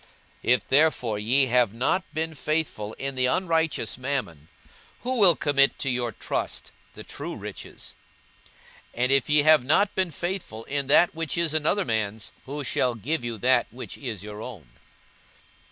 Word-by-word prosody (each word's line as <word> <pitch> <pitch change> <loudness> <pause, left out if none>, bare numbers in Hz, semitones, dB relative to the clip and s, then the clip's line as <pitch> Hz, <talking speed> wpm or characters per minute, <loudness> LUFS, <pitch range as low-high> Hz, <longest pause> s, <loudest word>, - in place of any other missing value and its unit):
42:016:011 125 - +4
If 110 - -7
therefore 130 -7 +2
ye 125 +6 +3
have 125 -4 +2
not 130 +10 +1
been 160 +1 -3
faithful 150 -9 -2
in 135 0 -4
the 130 -1 +1
unrighteous 160 - 0
mammon, 125 - -3 0.5
who 255 0 -1
will 185 -5 +6
commit 140 -2 +2
to 135 - -1
your 120 -1 -1
trust - - -4 0.2
the - - -9
true - - -6
riches? - - -9 1.0
42:016:012 120 - 0
And 125 - +2
if 135 +1 +2
ye 150 0 +5
have 155 -3 +6
not 195 +10 +2
been 185 -2 0
faithful 175 - -5
in 140 +2 -3
that 150 +5 +5
which 165 0 -3
is 170 -2 +1
another 155 +6 +1
man's, 110 -3 -2 0.2
who 145 +2 -4
shall 125 -1 0
give 130 +6 -2
you 120 -1 -4
that 130 +5 +3
which 125 - -8
is 115 -8 -6
your 105 0 -8
own? 105 - -9
135 Hz, 170 wpm, -26 LUFS, 115-160 Hz, 1.0 s, will